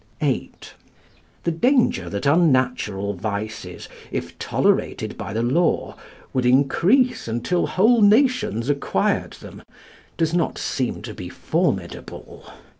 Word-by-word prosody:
VIII. - - -1 0.9
The 170 - 0
danger 200 - +2
that 100 +1 -4
unnatural 130 - +2
vices, 105 -1 -5 0.2
if - - -4
tolerated - - 0
by 100 - -6
the 115 +3 -1
law, 160 +8 +1 0.4
would 130 - +1
increase 170 - +3
until 120 +10 -1
whole 225 +5 +3
nations 215 - +3
acquired 145 -1 0
them, - - -12 0.6
does 165 -1 0
not 170 -2 0
seem 125 -5 -2
to 110 -2 -7
be 90 -3 -8
formidable. - - -3
135 Hz, 115 wpm, -22 LUFS, 110-180 Hz, 0.9 s, increase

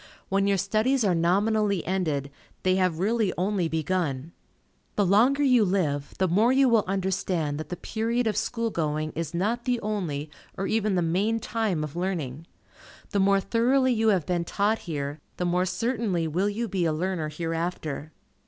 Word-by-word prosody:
When 195 +1 +2
your 200 -1 +3
studies 235 +7 +1
are 190 - +3
nominally 200 +3 +1
ended, 155 -7 -1 0.3
they 185 - +3
have 185 -4 +1
really 210 +2 +1
only 185 -1 0
begun. 160 -3 -2 0.6
The 205 - +2
longer 245 +10 +4
you 250 -5 +5
live, 160 -8 -1
the 190 - +2
more 200 +7 +3
will 250 - +4
you 265 -3 +4
understand 185 -6 -1
that 155 - -6
the 180 - -3
period 230 +6 -1
of 215 -2 0
school 230 +1 -1
going 155 -2 -1
is 165 0 -4
not 225 +7 -1
the 250 -2 +1
only, 165 -9 -3 0.3
or 195 - -2
even 215 -2 +1
the 175 - +2
main 200 +7 +1
time 215 -9 -1
of 150 0 -6
learning. 165 -5 -3 0.6
The 200 - +1
more 195 0 +4
thoroughly 250 +6 +2
you 225 -1 +1
have 190 -8 +3
been 175 -1 0
taught 205 +5 0
here, 145 -1 -3 0.2
the 180 - -1
more 180 +1 +1
certainly 195 -3 -1
will 180 +6 0
you 230 +3 -2
be 185 -3 -1
a 160 - +2
learner 165 -1 -2
hereafter. 165 -2 -3
190 Hz, 175 wpm, -26 LUFS, 165-220 Hz, 0.6 s, you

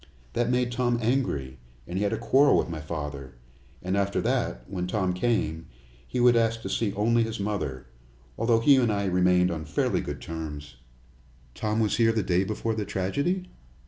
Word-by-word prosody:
That 120 0 0
made 125 -1 +1
Tom 120 0 +1
angry, 110 - -1 0.3
and 85 - -7
he 95 - 0
had 100 - +1
a - - -1
quarrel 140 +1 +4
with - - +1
my 80 -2 -5
father, 75 -4 -6 0.5
and 95 +2 -1
after 100 0 0
that - - -1
when 90 -2 -3
Tom 95 -1 0
came 90 -6 -1 0.4
he 125 - -3
would 120 0 +6
ask 115 -1 +1
to 95 - -4
see 100 +1 0
only 115 +3 +2
his 115 -2 -2
mother, 100 -11 -3 0.5
although 115 0 +2
he 140 +3 +6
and 120 -4 +3
I 100 -1 -1
remained 90 -1 +3
on 80 -2 -4
fairly 75 -1 0
good - - -5
terms." 75 -5 -7 0.8
"Tom 105 - -1
was 110 -2 +1
here 115 -1 +4
the 110 -2 0
day 90 +1 +2
before 110 +3 -2
the 110 -1 -2
tragedy?" 140 - -1
100 Hz, 185 wpm, -27 LUFS, 85-115 Hz, 0.8 s, would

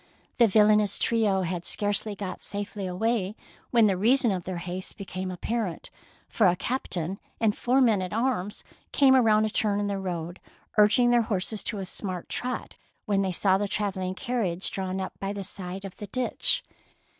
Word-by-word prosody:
The 235 - +7
villainous 210 -1 +4
trio 210 -5 +2
had 175 0 -3
scarcely 205 +2 -1
got 195 -2 -6
safely 205 -1 -4
away, 210 +2 -1 0.3
when 230 -2 +5
the 195 -3 +3
reason 235 +5 +3
of 180 -3 -3
their 185 -1 -4
haste 180 +2 -5
became 185 -1 -5
apparent, 190 0 -3 0.4
for 215 - +3
a 175 - +4
captain 190 -6 -3 0.2
and 220 -2 +2
four 255 +2 +2
men 220 -6 +4
at 185 - -4
arms 220 -4 -1 0.3
came 270 -2 +5
around 220 -4 +4
a - - 0
turn 205 -1 +1
in 205 - 0
the 200 -1 -2
road, 175 -2 -4 0.4
urging 220 +3 +5
their 240 -1 +5
horses 210 -1 -2
to 210 - -2
a 195 - -4
smart 185 -1 -5
trot, 250 0 -4 0.3
when 200 -3 +1
they 190 -1 0
saw 190 +1 +2
the 205 - 0
travel 200 -2 -2
ling 185 0 -2
carriage 200 -7 -2
drawn 190 0 -3
up 190 - -4
by 195 +1 -3
the 200 -1 -5
side 190 0 -6
of 195 - -8
the 205 - -7
ditch. 250 +4 +1
200 Hz, 185 wpm, -27 LUFS, 185-220 Hz, 0.4 s, The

